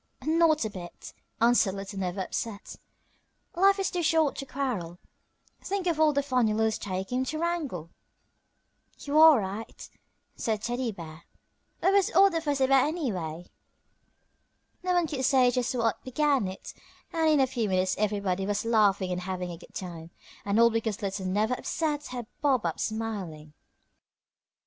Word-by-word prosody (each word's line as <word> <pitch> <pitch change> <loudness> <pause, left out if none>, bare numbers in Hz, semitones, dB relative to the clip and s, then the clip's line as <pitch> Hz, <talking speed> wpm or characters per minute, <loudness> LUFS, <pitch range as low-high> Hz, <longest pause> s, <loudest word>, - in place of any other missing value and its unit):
"Not 315 -3 +3
a - - -2
bit," 175 -3 -10 0.3
answered 230 -4 +3
Little 195 0 -6
Never 185 0 -2
upset; 205 +2 -5 0.8
"life 390 +3 +4
is 390 -2 -1
too 355 - -1
short 320 -3 +2
to 275 - -6
quarrel. 225 -12 -3 0.7
Think 395 -1 -2
of 335 -3 0
all 310 -1 +5
the 285 -1 0
fun 255 -4 +2
you 215 - 0
lose 220 0 +1
taking 195 +5 -3
time 260 - 0
to 310 - -3
wrangle." 305 - -3 1.1
"You 290 +2 0
are 315 -5 +8
right," 200 +3 -6 0.5
said 220 -2 -2
Teddy 245 0 -2
Bear. 165 -4 -10 0.6
"What 380 - +3
was 400 -2 +4
all 395 0 +5
the 330 -1 -1
fuss 290 -3 -1
about, 265 +1 +4
anyway?" 185 - -3 1.4
No 365 0 0
one 350 -1 +3
could 285 -4 -4
say 255 -2 +4
just 250 0 -1
what 230 -3 0
began 275 -4 +1
it, 190 +1 -8 0.4
and 320 -1 +2
in 305 -2 +4
a 265 - +5
few 245 -5 -2
minutes 185 0 +1
everybody 200 -3 -1
was 205 +1 -1
laughing 205 -5 +2
and 180 0 -2
having 180 -1 -4
a 170 - -7
good - - -17
time, 170 -3 -7 0.3
and 200 +2 +1
all 235 0 +6
because 225 -2 -2
Little 195 -1 -3
Never 210 +6 +1
upset 300 +3 -2
had 245 -2 -6 0.2
bobbed 265 -8 +2
up 165 - -2
smiling. 195 -9 -4
230 Hz, 165 wpm, -28 LUFS, 190-295 Hz, 1.4 s, are